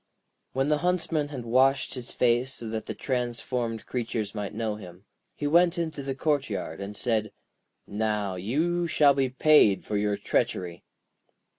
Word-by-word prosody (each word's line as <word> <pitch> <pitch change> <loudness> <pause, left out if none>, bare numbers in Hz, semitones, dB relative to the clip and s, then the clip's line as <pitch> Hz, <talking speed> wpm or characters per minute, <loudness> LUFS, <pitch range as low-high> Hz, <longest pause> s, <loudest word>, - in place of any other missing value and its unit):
] - - -50
When 135 +2 +1
the 150 -1 +2
Huntsman 165 -4 0
had 135 -5 -7
washed 130 +3 +3
his 125 -2 -4
face 125 +2 +1
so 115 - -4
that 110 0 -4
the - - -4
transformed 120 -2 -2
creatures 115 -4 -3
might 105 -2 -4
know 110 -1 -2
him, 90 -2 -12 0.3
he 145 - -4
went 170 +4 +4
into 160 -4 -3
the 135 -1 -4
courtyard, 135 - -1
and 100 +1 -6
said: 110 -4 0 0.5
'Now, 105 -2 -1
you 160 - 0
shall 150 -3 +5
be 135 -1 +1
paid 130 -7 +4
for 105 - -1
your 105 0 0
treachery.' 90 -3 -1
120 Hz, 160 wpm, -27 LUFS, 105-145 Hz, 0.5 s, shall